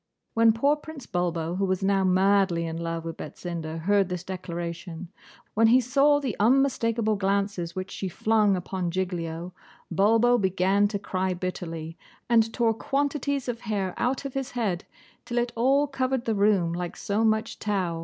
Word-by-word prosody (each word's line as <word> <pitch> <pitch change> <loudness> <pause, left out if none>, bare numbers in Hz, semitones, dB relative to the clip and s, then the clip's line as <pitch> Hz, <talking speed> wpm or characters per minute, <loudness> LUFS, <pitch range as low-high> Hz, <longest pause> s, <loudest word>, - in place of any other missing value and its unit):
When 225 0 +5
poor 275 +7 +2
Prince 295 -3 -10
Bulbo, 175 -2 -2
who 195 - +1
was 185 0 -1
now 195 0 +2
madly 190 -2 +3
in 160 0 -4
love 165 0 -4
with 165 -1 -5
Betsinda, 165 0 -6
heard 200 +1 +2
this 180 -1 -4
declaration, 170 -2 -6 0.4
when 225 +1 +4
he 245 +3 +6
saw 280 +4 +3
the 265 -7 -3
unmistakable 230 -2 +2
glances 195 -3 -1
which 185 +1 -5
she 190 - -4
flung 210 +2 +2
upon 180 0 -3
Giglio, 175 -1 -3 0.4
Bulbo 225 +7 +4
began 190 +1 +2
to 205 0 -3
cry 190 -2 -2
bitterly, 165 -3 -5 0.3
and 225 -1 +3
tore 230 -1 +2
quantities 280 +2 -1
of 240 -2 -3
hair 195 -4 -2
out 255 +3 -1
of 275 - -4
his 270 -1 -3
head, 210 -9 -2 0.4
till 245 0 -4
it 240 0 +1
all 270 +5 +3
covered 265 -2 -1
the 225 - +1
room 200 -5 +2
like 175 0 -4
so 215 +1 -1
much 220 0 0
tow. 185 -6 -1
200 Hz, 165 wpm, -26 LUFS, 180-235 Hz, 0.4 s, he